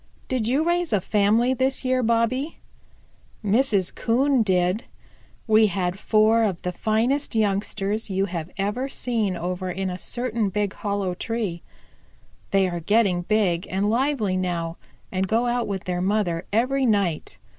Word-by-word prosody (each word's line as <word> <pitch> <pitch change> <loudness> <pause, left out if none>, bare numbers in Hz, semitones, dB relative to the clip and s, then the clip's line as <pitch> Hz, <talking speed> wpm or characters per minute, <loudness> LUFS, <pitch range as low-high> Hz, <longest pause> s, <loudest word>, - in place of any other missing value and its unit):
Did 250 -4 -1
you 270 +6 +2
raise 345 -1 +1
a 205 - +4
family 215 +6 +2
this 260 +1 0
year, 255 0 +2
Bobby?" 235 +6 0 0.9
"Mrs. 205 -3 +2
Coon 260 +3 +2
did. 185 +1 +1 0.6
We 220 -1 +5
had 180 -1 -2
four 220 +1 +3
of 195 -6 -1
the 180 - -1
finest 230 +8 0
youngsters 205 0 0
you 195 0 +1
have 170 -3 -5
ever 210 +7 -1
seen 225 -8 -1
over 180 +2 -3
in 190 +1 -2
a 180 - -6
certain 235 -1 -2
big 205 0 -1
hollow 200 -3 -2
tree. 200 -3 -3 0.9
They 195 -1 +3
are 175 -1 -3
getting 195 0 +2
big 185 -3 +1
and 200 +3 0
lively 240 -6 +1
now, 170 -2 -2 0.3
and 190 0 -1
go 225 +4 +1
out 240 -1 0
with 195 -2 -3
their 180 -1 -2
mother 185 -3 0
every 255 +5 +2
night. 200 -7 0
210 Hz, 150 wpm, -24 LUFS, 185-235 Hz, 0.9 s, We